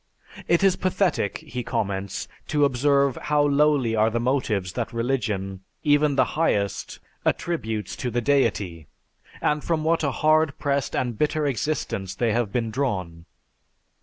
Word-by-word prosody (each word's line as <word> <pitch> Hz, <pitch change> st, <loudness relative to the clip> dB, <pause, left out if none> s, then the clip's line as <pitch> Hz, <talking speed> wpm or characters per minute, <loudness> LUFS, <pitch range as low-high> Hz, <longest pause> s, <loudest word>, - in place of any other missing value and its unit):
"It 170 Hz, +2 st, +3 dB
is 195 Hz, -2 st, +4 dB
pathetic," 185 Hz, -, 0 dB
he 125 Hz, -, -6 dB
comments, 100 Hz, -4 st, -3 dB, 0.2 s
"to 145 Hz, -1 st, +3 dB
observe 140 Hz, 0 st, +2 dB
how 150 Hz, -1 st, +2 dB
lowly 140 Hz, -5 st, +3 dB
are 110 Hz, 0 st, +3 dB
the 115 Hz, +1 st, -1 dB
motives 115 Hz, -7 st, 0 dB
that 120 Hz, -1 st, -3 dB
religion, 110 Hz, -6 st, -2 dB, 0.2 s
even 145 Hz, -1 st, +3 dB
the -, -, +4 dB
highest, 105 Hz, -11 st, 0 dB, 0.3 s
attributes 110 Hz, -11 st, -2 dB
to 125 Hz, -, -2 dB
the 120 Hz, +1 st, 0 dB
deity, 105 Hz, -, 0 dB, 0.5 s
and 150 Hz, 0 st, +1 dB
from 160 Hz, -2 st, 0 dB
what 165 Hz, +1 st, +1 dB
a 140 Hz, -, +2 dB
hard 155 Hz, +3 st, +2 dB
pressed 140 Hz, -1 st, -1 dB
and 120 Hz, -4 st, -2 dB
bitter 150 Hz, 0 st, +1 dB
existence 120 Hz, -, -2 dB
they 115 Hz, -1 st, +1 dB
have 115 Hz, -3 st, 0 dB
been 115 Hz, -1 st, -1 dB
drawn. 95 Hz, -11 st, -2 dB
130 Hz, 145 wpm, -24 LUFS, 110-150 Hz, 0.5 s, is